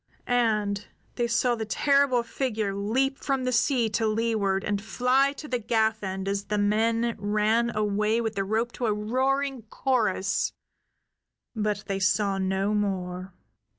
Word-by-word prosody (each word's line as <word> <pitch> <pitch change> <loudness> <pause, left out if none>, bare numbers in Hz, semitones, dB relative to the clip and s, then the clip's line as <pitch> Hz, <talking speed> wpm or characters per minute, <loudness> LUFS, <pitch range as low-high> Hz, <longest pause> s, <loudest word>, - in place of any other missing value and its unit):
And 210 -4 +1 0.3
they 240 -1 -1
saw 240 +1 +2
the 225 -2 -3
terrible 275 0 +3
figure 225 -4 -2
leap 255 +8 0
from 270 -2 -1
the 255 - 0
sea 245 0 +2
to 220 +1 0
leeward 215 -3 0
and 205 -1 -1
fly 255 +5 +2
to 300 +1 -9
the 250 -3 -1
gaff 220 -1 +1
end 190 -1 -4
as 200 0 -1
the 210 +1 -1
men 225 +3 +1
ran 215 +3 +1
away 210 +1 +1
with 225 -2 -2
the 195 -2 -1
rope 220 +4 -1
to 240 - -2
a 215 - +2
roaring 265 +5 0
chorus. 215 -8 0 1.0
But 210 -1 -1
they 195 -1 -2
saw 195 +1 +1
no 190 +2 0
more. 185 -3 -2
220 Hz, 150 wpm, -26 LUFS, 200-240 Hz, 1.0 s, terrible